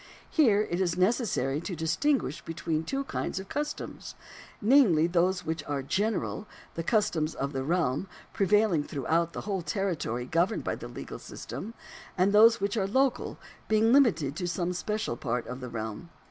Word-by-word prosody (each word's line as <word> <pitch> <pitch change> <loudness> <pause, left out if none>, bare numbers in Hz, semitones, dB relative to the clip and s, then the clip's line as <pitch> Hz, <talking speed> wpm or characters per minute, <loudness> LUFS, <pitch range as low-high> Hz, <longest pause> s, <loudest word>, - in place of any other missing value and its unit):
Here 220 -10 +4
it 175 -3 -2
is 175 -2 0
necessary 185 - +1
to 180 +1 -4
dis 160 -1 -1
tinguish 285 - 0
between 165 -1 -2
two 275 +10 -2
kinds 235 - -3
of 190 - -9
customs, 295 +1 -5 0.4
namely, 210 - +5
those 180 +2 +1
which 160 -1 -2
are 140 -2 -2
general 210 +6 -1
— - - -24
the 165 - -3
customs 165 -5 +1
of 140 +2 -3
the 135 -1 -2
realm, 160 0 0 0.3
prevailing 205 -5 +3
throughout 165 +5 -1
the - - -4
whole 195 -3 -2
territory 170 - -2
governed 170 - +1
by - - -1
the - - -7
legal - - -8
system 230 +3 -8 0.2
— - - -17
and 190 +2 +3
those 225 +2 +7
which 200 +2 -1
are 195 -2 +1
local, 260 +4 +1 0.3
being 220 +2 +4
limited 165 - +4
to 180 - -2
some 175 +1 -1
special 210 - -2
part 120 -1 -2
of 125 +1 -6
the 125 -1 -6
realm. 110 +8 -5
180 Hz, 175 wpm, -28 LUFS, 155-215 Hz, 0.4 s, those